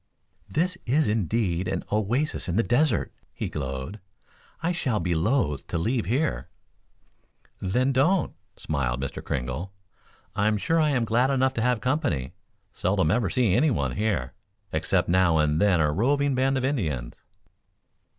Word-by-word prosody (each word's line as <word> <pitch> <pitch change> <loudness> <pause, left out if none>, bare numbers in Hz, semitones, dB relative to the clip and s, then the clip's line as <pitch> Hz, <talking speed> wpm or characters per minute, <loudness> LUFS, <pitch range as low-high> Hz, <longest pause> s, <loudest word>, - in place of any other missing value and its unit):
"This 180 +4 0
is 145 +3 +3
indeed 105 -3 0
an - - -2
oasis 110 - 0
in 85 - -1
the 115 - +3
desert," 125 -1 +1 0.2
he - - -4
glowed. 70 +7 -5 0.6
"I 170 - +1
shall 130 -11 -1
be 85 0 0
loath 80 - 0
to - - -2
leave 115 +8 0
here." 140 +7 -1 1.1
"Then 125 +8 +1
don't," 155 +7 +2 0.2
smiled 65 -5 -2
Mr. 70 0 -5
Kringle. 65 +9 -3 0.6
"I'm 105 +1 +2
sure 165 +10 +1
I 155 -1 +3
am 125 -5 +1
glad 120 +4 +2
enough 130 -1 +2
to 115 - -2
have 125 -1 +1
company. 125 - -1 0.4
Seldom 80 - +1
ever 105 -2 +1
see 120 -3 +2
anyone 115 - +2
here, 90 - -1 0.4
except 90 +3 +1
now 85 -2 +3
and 75 0 +2
then 100 -4 +4
a 75 -1 +2
roving 140 - +1
band 135 +1 +1
of 130 - 0
Indians." 80 - -2
110 Hz, 150 wpm, -26 LUFS, 80-130 Hz, 1.1 s, then